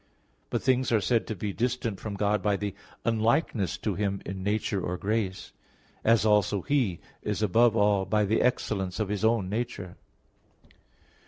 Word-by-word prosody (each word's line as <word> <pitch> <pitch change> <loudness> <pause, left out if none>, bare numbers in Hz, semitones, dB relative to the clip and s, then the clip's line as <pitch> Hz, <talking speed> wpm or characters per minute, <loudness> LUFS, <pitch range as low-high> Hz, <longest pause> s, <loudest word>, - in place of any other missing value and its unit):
But - - -2
things 130 -1 +2
are 115 - +4
said 115 +3 +1
to 110 - -3
be 100 +1 -3
distant 120 -3 -1
from 105 -2 -5
God 105 0 +1
by 100 +1 +2
the 100 -1 -3 0.3
unlikeness 115 - +1
to - - -2
Him 100 -1 -1
in 95 -1 -5
nature 100 0 -1
or 90 +1 -3
grace; 100 -1 -2 0.5
as 115 -1 +4
also 105 -2 +3
He 125 - +1 0.2
is 105 0 -2
above 115 +3 +4
all 100 -2 +3
by 105 0 +2
the 110 +3 +1
excellence 100 -6 0
of 105 -3 -1
His 105 0 -2
own 110 -4 +2
nature. 105 -4 -4
105 Hz, 165 wpm, -28 LUFS, 100-115 Hz, 0.5 s, are